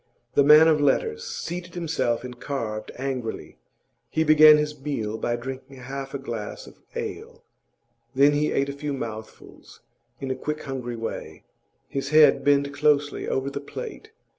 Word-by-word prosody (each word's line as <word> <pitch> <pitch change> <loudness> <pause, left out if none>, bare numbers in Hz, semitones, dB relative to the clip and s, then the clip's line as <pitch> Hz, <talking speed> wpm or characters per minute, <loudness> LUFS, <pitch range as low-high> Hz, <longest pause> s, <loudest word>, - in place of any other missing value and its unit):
The 140 - +5
man 150 +3 +8
of 155 -2 +3
letters 450 - +1
seated 180 - -6
himself 160 -9 -1
and 125 -1 -9
carved 110 -6 -4
angrily. 130 -3 -5 0.5
He 160 - +1
began 155 0 +8
his 150 -1 -3
meal 115 -7 -3
by 120 - 0
drinking 130 +2 -7
half 135 +2 -7
a - - 0
glass 115 -6 -6
of - - -15 0.2
ale; - - -6 0.7
then 140 +2 +6
he 145 +1 +1
ate 140 - +1
a - - -4
few 145 0 -4
mouthfuls 110 -4 -9 0.4
in 135 -1 -3
a - - -1
quick, 150 +4 -4
hungry 125 -3 -5
way, 115 0 -6 0.4
his 135 0 -4
head 155 -2 +6
bent 140 0 +2
closely 145 0 +1
over 135 +1 -1
the 140 - -5
plate. 440 - -8
140 Hz, 160 wpm, -25 LUFS, 130-150 Hz, 0.7 s, man